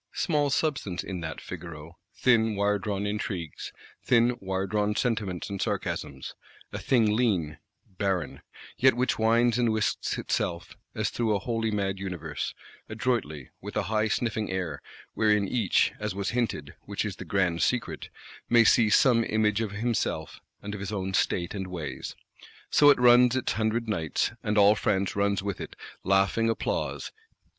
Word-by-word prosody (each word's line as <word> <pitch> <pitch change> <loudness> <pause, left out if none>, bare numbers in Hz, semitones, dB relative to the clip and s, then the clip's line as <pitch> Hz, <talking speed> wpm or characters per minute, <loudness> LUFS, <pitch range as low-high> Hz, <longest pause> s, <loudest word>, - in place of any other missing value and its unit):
Small 150 -5 +1
substance 135 - -1
in 95 -2 -5
that 80 -1 -5
Figaro: 85 -2 -9 0.2
thin 110 -1 +3
wiredrawn 100 0 0
intrigues, 100 -6 -4 0.3
thin 120 0 +3
wiredrawn 100 +2 -1
sentiments 105 -7 -1
and 100 -1 -5
sarcasms; 65 -1 -3 0.4
a - - -3
thing 110 -5 +2
lean, 95 -11 0 0.3
barren; 95 -4 -2 0.4
yet 130 -1 +5
which 125 -1 0
winds 115 +2 +3
and 120 -2 +3
whisks 110 -1 -1
itself, 85 -1 -2 0.2
as - - -1
through 110 -3 0
a - - 0
wholly 115 +1 -1
mad 100 -2 -1
universe, 85 -6 -4 0.3
adroitly, 110 - -2
with - - -6
a - - +1
high 110 0 +2
sniffing 110 -1 -1
air: 90 -6 -3 0.3
wherein 105 -2 +2
each, 110 -3 +2
as - - -3
was 100 0 -2
hinted, 115 - -2
which - - -2
is - - -4
the - - -7
grand 90 -4 0
secret, 125 -2 -1 0.4
may 120 -1 +6
see 115 0 +5
some 115 +1 +5
image 110 0 +1
of 110 - -1
himself, 115 +3 -2 0.2
and 105 +1 -5
of 105 - -5
his 100 +1 -5
own 95 -2 -3
state 85 -2 0
and 95 -2 -4
ways. 90 -4 -6 0.6
So 145 - +6
it 145 - +6
runs 125 0 +6
its 130 - 0
hundred 110 +1 -1
nights, 80 -8 -1
and 105 0 -1
all 100 0 +7
France 100 -2 0
runs 100 -1 +1
with 100 -2 -3
it; - - -7 0.3
laughing 100 +4 +2
applause. 115 - -2
105 Hz, 155 wpm, -27 LUFS, 95-115 Hz, 0.6 s, all